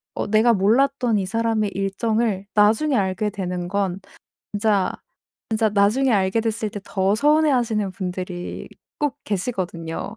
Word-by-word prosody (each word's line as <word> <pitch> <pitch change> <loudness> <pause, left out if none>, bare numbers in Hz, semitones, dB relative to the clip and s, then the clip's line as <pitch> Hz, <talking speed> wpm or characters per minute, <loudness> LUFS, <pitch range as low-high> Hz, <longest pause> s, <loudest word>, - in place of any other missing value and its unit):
어 - - -2
내가 220 +3 +4
몰랐던 240 +3 +2
이 195 - -1
사람의 220 0 0
일정을 200 +1 -1
나중에 220 +8 +3
알게 195 0 0
되는 180 -3 -4
건 195 -1 -1 0.5
진짜 205 -2 +1 0.6
진짜 220 0 +2
나중에 210 +6 +2
알게 195 +2 +2
됐을 220 -1 -2
때 205 - -6
더 195 0 +1
서운해하시는 245 -6 +2
분들이 180 -1 -5 0.3
꼭 295 -3 -1
계시거든요. 185 -2 -3
210 Hz, 290 characters per minute, -22 LUFS, 190-230 Hz, 0.6 s, 내가